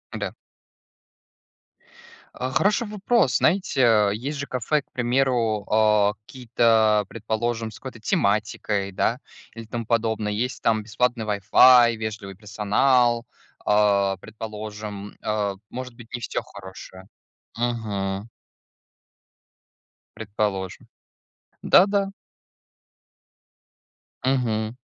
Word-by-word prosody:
Да. - - -4 2.0
А, 130 +1 -4
хороший 205 - +1
вопрос. 215 +3 +1
Знаете, 175 -7 +1
э, 105 -4 +4
есть 140 +7 -4
же 140 - -4
кафе, 130 +4 0
к - - -39
примеру, 120 -4 0
а, 105 -1 +3
какие-то, 115 -4 +2
предположим, 115 +1 -3
с - - -13
какой-то 130 -4 -9
тематикой, 105 -1 0
да, 115 +6 0 0.3
или 115 0 -9
тому 115 +1 -5
подобное. 110 -2 0
Есть 120 +5 -3
там 110 -1 +1
бесплатный 120 +1 -1
Wi-Fi, 115 +4 +6
вежливый 110 -3 -6
персонал, 115 +4 +1 0.4
а, 100 -2 +3
предположим, 105 -1 -8
а 105 -2 -1
может 125 -1 -7
быть, 120 -1 -14
не 120 - -4
всё - - -3
хорошее, 95 -1 -12 0.5
мгм. 105 -4 -2 1.9
Предположим, 105 -3 -3 0.8
да-да. 200 +1 +4 2.2
Мгм. 115 -3 0
110 Hz, 95 wpm, -24 LUFS, 105-125 Hz, 2.2 s, Wi-Fi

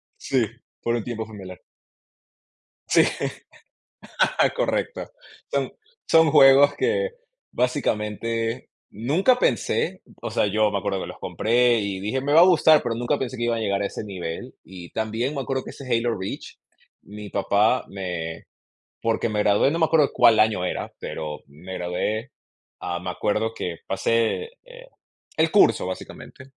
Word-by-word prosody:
Sí, 130 -4 0 0.4
por 120 0 0
un 115 - -2
tiempo 115 -2 -4
fue 110 -1 -12
mi 100 - -9
alarma. 90 -1 -11 1.3
Sí, - - +6 1.5
correcto. - - -2 0.4
Son 140 -2 -1 0.4
son 160 -2 +5
juegos 140 -1 +7
que, 480 +4 0 0.4
básicamente, 115 0 -1 0.2
nunca 170 - +2
pensé 185 -5 0 0.2
o 120 - -4
sea, 110 -2 +1
yo 105 +1 +2
me 100 - 0
acuerdo 100 -1 -2
que - - -5
los - - -10
compré, 120 +1 +2
y 100 -2 -3
dije: 105 +7 -2
"Me 145 +2 0
va 160 - +8
a - - +10
gustar", 160 -4 +5
pero 120 -2 -2
nunca 120 +5 0
pensé 130 -1 -4
que 120 - -3
iba 120 0 +1
a - - -3
llegar 100 -2 0
a - - 0
ese - - -7
nivel. 90 -5 -6
Y 90 -1 -11
también 115 +5 -2
me 135 - -2
acuerdo 130 +1 -2
que - - -9
ese 135 - -11
Halo 115 -1 +1
Reach, 95 - -6 0.5
mi 105 0 -9
papá 105 +5 +2
me 90 -4 -5 0.6
porque 115 0 0
me 105 -1 -2
gradué, 105 +6 +3
no 165 - -1
me 160 - +4
acuerdo 155 -3 +3
cuál 115 -2 +5
año 110 -4 +2
era, - - -4
pero 75 -1 -6
me 80 +7 -10
gradué, 105 +8 -3 0.5
ah, 85 0 -3
me 90 - -5
acuerdo 105 +5 -1
que 90 -6 -5
pasé, 115 - 0
eh, - - -14 0.5
el 160 0 +2
curso, 205 - +4
básicamente, 95 +7 -8
115 Hz, 165 wpm, -24 LUFS, 100-135 Hz, 1.5 s, a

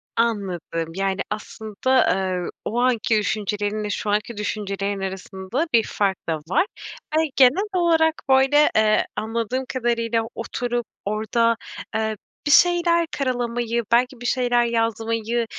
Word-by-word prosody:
Anladım. 185 -8 -1
Yani, 195 0 -1
aslında, 220 +4 0
eee, 185 -2 -2 0.2
o 235 - -1
anki 235 -3 +2
düşüncelerinle 210 0 -1
şu 205 +1 -3
anki 210 +2 -1
düşüncelerin 200 -1 -3
arasında 190 - -3
bir 230 -2 +5
fark 195 -2 0
da 165 - +1
var. 165 - +1 0.5
Yani, 320 -1 +2
genel 275 +11 +5
olarak 325 -2 +3 0.2
böyle, 270 +3 +5
eee, 215 0 +4
anladığım 230 +4 -2
kadarıyla 230 -2 0
oturup 240 +1 -3 0.2
orada, 220 +3 +1 0.4
eee, 220 -1 -1 0.3
bir 290 - +3
şeyler 340 0 +4
karalamayı, 240 -3 -1
belki 245 +1 +2
bir - - -7
şeyler 245 -1 +2
yazmayı, 230 0 -1
230 Hz, 125 wpm, -23 LUFS, 205-250 Hz, 0.5 s, bir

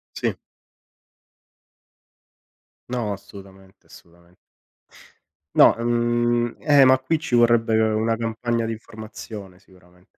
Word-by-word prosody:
Sì. - - -2 2.6
No, 120 -4 -2
assolutamente, 95 -1 -14
assolutamente. 85 +1 -19 1.2
No, - - +6
uhm, 120 0 0
eh, 145 -3 +5
ma 130 0 +5
qui 130 +5 -1
ci 155 -5 -4
vorrebbe 115 -1 +3
una 110 +1 +1
campagna 115 0 -2
di 115 - -3
informazione 110 -4 -10
sicurame 90 -2 -24
115 Hz, 95 wpm, -22 LUFS, 100-120 Hz, 2.6 s, No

